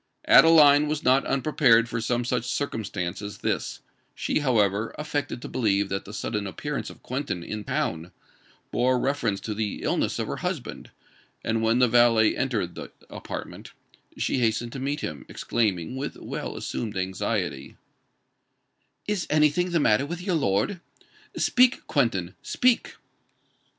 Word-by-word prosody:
Adeline 150 -2 +7
was 150 0 -2
not 130 +2 +3
unprepared 125 -4 +3
for 115 -1 -3
some 120 +1 -1
such 125 -1 -1
circumstance 105 -9 -3
as 100 0 -7
this; - - -2 0.3
she - - 0
however 110 -6 +1
affected 150 -4 -3
to - - -5
believe 100 -5 +1
that 95 0 -3
the 105 - -9
sudden 105 -1 -3
appearance 145 +9 -4
of - - -14
Quentin 130 -9 -3
in 105 +4 -5
town 85 -2 -2 0.6
bore 125 +1 +2
reference 125 -6 0
to 110 - -4
the 105 -1 -3
illness - - 0
of - - -1
her - - -4
husband; - - -5 0.5
and 115 0 0
when 115 +1 +2
the 125 0 +5
valet 115 -2 +4
entered 115 -10 -1
the - - -8 0.2
apartment, - - -8 0.4
she - - 0
hastened 115 0 0
to 135 - -6
meet 140 +3 -2
him, 70 -3 -5
exclaiming, 105 -3 -1
with 135 +2 -4
well - - -6
assumed 110 -4 -4
anxiety, 95 -7 -3 1.3
"Is 205 -4 -1
any 150 -1 +4
thing 180 +4 0
the 170 -1 +1
matter 135 0 +3
with 175 +2 -5
your 185 -1 -1
lord? 125 - 0 0.6
Speak, 250 +1 +3
Quentin—speak!" 120 - 0
120 Hz, 145 wpm, -26 LUFS, 105-145 Hz, 1.3 s, Adeline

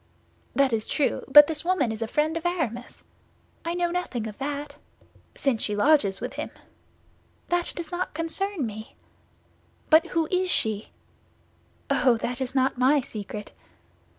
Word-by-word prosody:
"That 275 -3 +3
is 220 -1 -1
true; 290 - 0
but 295 +2 +10
this 300 -1 -4
woman 340 -10 +1
is 220 0 -6
a 225 - -1
friend 305 +6 0
of 330 - -3
Aramis—" 280 -10 -3 0.6
"I 335 +1 -2
know 350 -1 0
nothing 345 -11 -3
of 215 -2 -6
that." 285 +1 -4 0.6
"—since 265 -6 0
she 210 - -1
lodges 205 -4 +3
with - - -5
him." - - -4 1.0
"That 350 0 +2
does 340 0 -6
not 355 -2 -3
concern 330 0 -2
me." 220 0 -8 1.0
"But 315 +1 +6
who 330 -2 0
is 370 0 +1
she?" 215 - 0 1.0
"Oh, 250 -3 +4
that 245 +3 -4
is 260 0 -3
not 260 -1 +1
my 270 +4 +5
secret." 210 -3 -7
285 Hz, 150 wpm, -26 LUFS, 230-330 Hz, 1.0 s, but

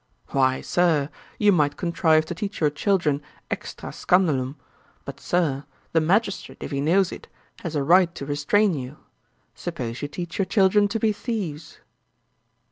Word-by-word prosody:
'Why, 130 -1 +2
Sir, 165 -5 +1 0.3
you 210 -1 +4
might 150 -6 +2
contrive 165 -3 +2
to 165 - -4
teach 200 +4 -5
your 150 -2 +2
children 150 -3 +1 0.3
extrÃ - - -5
scandalum; 145 -8 +1 0.5
but, - - -8
Sir, 150 -6 0 0.3
the 160 - +3
magistrate, 200 +5 0
if - - -6
he 140 -1 -1
knows 180 +5 +3
it, - - -9 0.3
has 165 -2 -5
a 145 - +1
right 175 +3 +5
to 140 - -6
restrain 160 +8 +2
you. 135 0 -6 0.6
Suppose 120 0 -5
you 145 - -2
teach 170 +4 -6
your 195 - +3
children 205 +1 +4
to 225 +2 -2
be 215 0 +2
thieves?' 190 - -5
165 Hz, 155 wpm, -24 LUFS, 145-190 Hz, 0.6 s, right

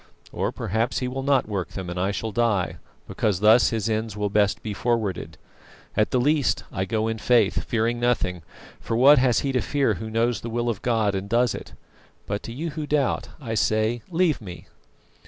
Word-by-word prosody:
Or - - -1
perhaps 110 +6 -1
He 125 - -1
will 130 +1 -4
not 135 -3 +2
work 100 -4 -4
them, 95 -2 -5
and 90 +1 -4
I 95 +2 +1
shall 110 +2 -3
die, 110 -4 0 0.3
because 100 -5 0
thus 110 +3 +6
His 115 -2 -2
ends 110 -1 -2
will 105 -1 -1
best 105 -1 +1
be 105 - -3
forwarded. 110 -3 -2 0.6
At 105 0 +2
the 125 - +1
least 145 +2 +1
I 95 -1 -2
go 110 +1 -1
in 110 0 -2
faith, 115 -3 +2
fearing 115 +1 0
nothing, 110 -8 0 0.4
for 115 - -2
what 140 +3 +7
has 125 -3 +3
he 140 - -1
to 130 -2 +1
fear 140 +4 +1
who 110 - -6
knows 115 -1 0
the 115 - -5
will 120 +1 -1
of 105 -4 -3
God 110 -4 +1
and 95 +1 -4
does 120 +1 +2
it? - - -8 0.5
But 100 +1 -3
to - - -5
you 155 +7 -4
who 150 0 -5
doubt, 145 -4 0
I 115 -6 -5
say 110 +2 +1
leave 170 -5 +1
me!" 90 -4 -9
115 Hz, 205 wpm, -24 LUFS, 105-125 Hz, 0.6 s, what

